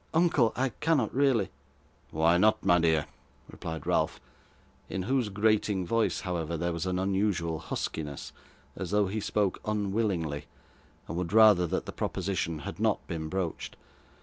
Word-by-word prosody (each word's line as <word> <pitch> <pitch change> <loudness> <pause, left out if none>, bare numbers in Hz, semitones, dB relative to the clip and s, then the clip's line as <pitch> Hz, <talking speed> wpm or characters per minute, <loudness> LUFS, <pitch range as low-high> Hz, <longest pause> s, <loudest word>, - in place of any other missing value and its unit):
Uncle, 160 -9 +4
I 130 +1 +1
cannot 145 -3 0
really 130 -8 +2 0.3
' - - -35
'Why 80 +2 +3
not, 110 +3 +3
my 90 -2 +5
dear?' 80 -3 +2 0.4
replied 80 -3 -7
Ralph, - - +1 0.7
in 95 - -3
whose 125 0 0
grating 105 -2 +1
voice, 115 +5 +1
however, 85 -3 -2
there 85 +2 -1
was 85 +2 -3
an 90 0 0
unusual 95 -4 0
huskiness, 75 -2 -5 0.4
as 90 -1 -5
though 105 0 +3
he 100 +3 -2
spoke 100 -2 0
unwillingly, 100 -8 -1 0.6
and 85 - -4
would 90 0 -3
rather 105 -5 +7
that - - -2
the - - -5
proposition 90 -4 -2
had - - -6
not - - +1
been 80 -2 -4
broached. 95 -2 -3
95 Hz, 150 wpm, -29 LUFS, 85-110 Hz, 0.7 s, rather